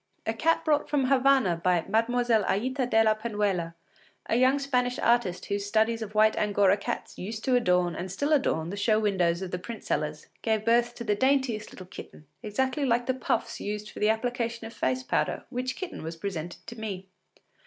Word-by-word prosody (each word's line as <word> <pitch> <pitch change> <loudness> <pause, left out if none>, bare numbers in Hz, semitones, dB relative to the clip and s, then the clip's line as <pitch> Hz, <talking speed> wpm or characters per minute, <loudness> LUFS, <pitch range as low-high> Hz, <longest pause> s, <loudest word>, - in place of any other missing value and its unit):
A 225 - 0
cat 325 +7 +1
brought 300 -2 +2
from 275 -3 +1
Havana 265 -8 +4
by 175 0 +1
Mlle. 230 +1 +2
Aïta 255 +4 0
de 225 -1 +5
la 215 -1 +4
Penuela, 205 -6 -2 0.5
a - - 0
young 255 +3 +4
Spanish 250 -3 0
artist 210 -7 +1
whose 200 0 -2
studies 220 +2 +1
of 215 -1 -6
white 215 +1 +5
angora 205 -2 +3
cats 200 - -5
used 215 +4 -5
to 255 - +2
adorn 180 -7 +2
and 185 +1 -5
still 285 +10 0
adorn 170 - +1
the 200 - -5
show 215 +1 +2
windows 185 -4 +1
of 185 - -6
the 180 - -3
print 230 +4 -8
sellers, - - -2 0.2
gave 220 -2 0
birth 240 +1 +3
to 235 - -6
the 210 -3 +1
daintiest 260 -2 +1
little 185 - -10
kitten, 165 -3 -11 0.2
exactly 260 +6 -1
like 240 -2 +2
the 260 - +1
puffs 250 -3 -2
used 210 +1 -4
for - - -10
the 210 - +3
application 230 0 -1
of 225 - -8
face 130 - -1
powder, - - -1
which 255 0 -2
kitten 370 - -6
was 165 +1 -5
presented 175 -1 -6
to 235 - -8
me. 195 -4 -5
220 Hz, 195 wpm, -27 LUFS, 195-245 Hz, 0.5 s, de